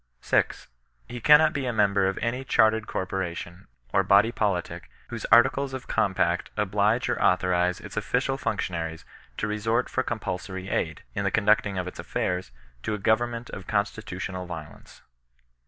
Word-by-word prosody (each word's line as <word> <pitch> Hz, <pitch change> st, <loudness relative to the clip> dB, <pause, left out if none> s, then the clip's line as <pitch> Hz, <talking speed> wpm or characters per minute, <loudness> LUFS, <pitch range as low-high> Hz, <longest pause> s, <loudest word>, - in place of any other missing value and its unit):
6. -, -, 0 dB, 0.4 s
He 120 Hz, +1 st, -7 dB
cannot 150 Hz, +3 st, +6 dB
be 140 Hz, -4 st, -2 dB
a -, -, +1 dB
member 100 Hz, -3 st, +2 dB
of 95 Hz, -, -2 dB
any 125 Hz, +3 st, -1 dB
chajrtered 110 Hz, -3 st, +3 dB
corpora 95 Hz, -2 st, -3 dB
tion, 85 Hz, +2 st, -9 dB, 0.3 s
or 95 Hz, -, +5 dB
body 100 Hz, +4 st, +4 dB
politic, 90 Hz, -6 st, -2 dB, 0.2 s
whose -, -, -5 dB
articles 130 Hz, +4 st, +4 dB
of 130 Hz, -, -8 dB
compact 95 Hz, -2 st, +1 dB
oblige 105 Hz, +3 st, +1 dB
or -, -, -1 dB
authorize 90 Hz, -1 st, +2 dB
its -, -, -10 dB
official -, -, 0 dB
functionaries 80 Hz, -2 st, -3 dB, 0.3 s
to -, -, -1 dB
resort 110 Hz, +3 st, 0 dB
for 130 Hz, -, 0 dB
compulsory 95 Hz, -5 st, -4 dB
aid, -, -, -2 dB
in 100 Hz, -, -2 dB
the 100 Hz, -, +2 dB
conducting 105 Hz, -1 st, +2 dB
of 90 Hz, 0 st, -2 dB
its 90 Hz, -, -8 dB
aflairs, 90 Hz, -3 st, -2 dB, 0.3 s
to 105 Hz, -, -2 dB
a -, -, -4 dB
government 115 Hz, +3 st, 0 dB
of 95 Hz, -1 st, -8 dB
constitutional 100 Hz, -3 st, -3 dB
violence. 80 Hz, -4 st, -10 dB
100 Hz, 155 wpm, -26 LUFS, 90-115 Hz, 0.4 s, cannot